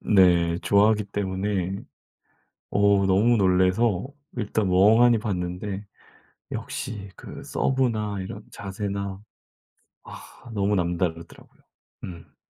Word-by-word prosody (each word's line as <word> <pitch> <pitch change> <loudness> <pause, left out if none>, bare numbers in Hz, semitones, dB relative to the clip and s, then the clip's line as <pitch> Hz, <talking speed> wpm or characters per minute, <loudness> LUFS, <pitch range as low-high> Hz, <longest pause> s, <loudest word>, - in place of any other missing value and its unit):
네 90 -4 +4
좋아하기 105 +1 +3
때문에 95 -1 -2 0.9
어 100 -1 +3
너무 105 +6 +4
놀래서 95 +3 +2 0.3
일단 105 -2 -1
멍하니 110 +6 +5
봤는데 95 -1 -3 0.7
역시 100 -3 -5
그 - - -10
서브나 110 -7 0
이런 100 +3 -7
자세나 100 -1 -5 0.8
아 - - -13
너무 100 0 +1
남다르더라고요. 85 -2 -3 0.4
음. 85 -2 -10
100 Hz, 210 characters per minute, -25 LUFS, 95-105 Hz, 0.9 s, 멍하니